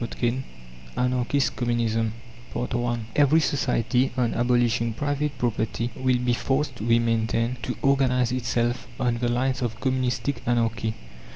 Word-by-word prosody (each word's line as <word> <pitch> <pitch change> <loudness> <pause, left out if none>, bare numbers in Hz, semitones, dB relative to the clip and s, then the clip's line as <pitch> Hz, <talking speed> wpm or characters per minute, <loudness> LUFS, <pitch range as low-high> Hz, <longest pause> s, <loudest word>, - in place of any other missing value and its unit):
CHAPTER 120 - -3
III 125 +3 0 0.5
ANARCHIST 125 +2 +1
COMMUNISM 115 -2 0 0.4
I 120 0 -1 0.2
Every 145 +2 +5
society, 130 -3 +1
on 120 -2 +1
abolishing 120 -1 +2
private 145 +2 -2
property 115 0 -1
will 130 -1 +2
be 125 0 +1
forced, 135 +1 -1
we 115 +1 +3
maintain, 115 +1 0
to 125 +1 -4
organize 125 -3 +3
itself 120 0 -1
on 120 -2 +1
the 120 0 0
lines 125 +1 0
of 120 -2 -2
Communistic 130 +1 -1
Anarchy. 115 -2 0
120 Hz, 130 wpm, -25 LUFS, 115-130 Hz, 0.5 s, Every